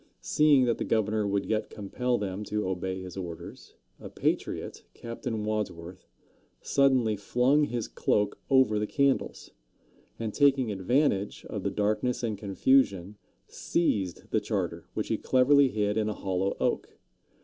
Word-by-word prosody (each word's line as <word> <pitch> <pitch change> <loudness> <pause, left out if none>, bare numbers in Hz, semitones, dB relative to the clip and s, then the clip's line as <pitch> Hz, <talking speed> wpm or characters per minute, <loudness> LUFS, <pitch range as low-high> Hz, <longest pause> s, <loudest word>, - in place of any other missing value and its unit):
Seeing 145 - +4
that 120 -2 0
the - - -1
governor 110 -1 0
would 100 0 0
yet 110 -1 -1
compel 120 +5 -2
them 100 0 -4
to 105 -2 -2
obey 95 0 -3
his 90 -2 -9
orders, 85 -3 -8 0.2
a - - -9
patriot, - - -2
Captain 115 -2 -5
Wadsworth, 95 -5 -4 0.5
suddenly 130 -6 +2
flung 125 +8 +2
his 120 -5 -3
cloak 105 -1 0
over 130 -6 +4
the 105 - -1
candles, 140 +1 0 0.7
and 110 -2 -4
taking 135 -5 +3
advantage 100 +1 0
of - - -5
the - - -1
darkness 110 +5 -1
and 110 -3 -1
confusion, 100 -1 +1 0.3
seized 100 - -2
the - - +2
charter, - - -3
which - - -3
he - - 0
cleverly 140 +2 +4
hid 105 -2 -1
in 110 -1 +1
a 105 - -3
hollow 95 0 -2
oak. - - -2
105 Hz, 145 wpm, -28 LUFS, 100-125 Hz, 0.7 s, Seeing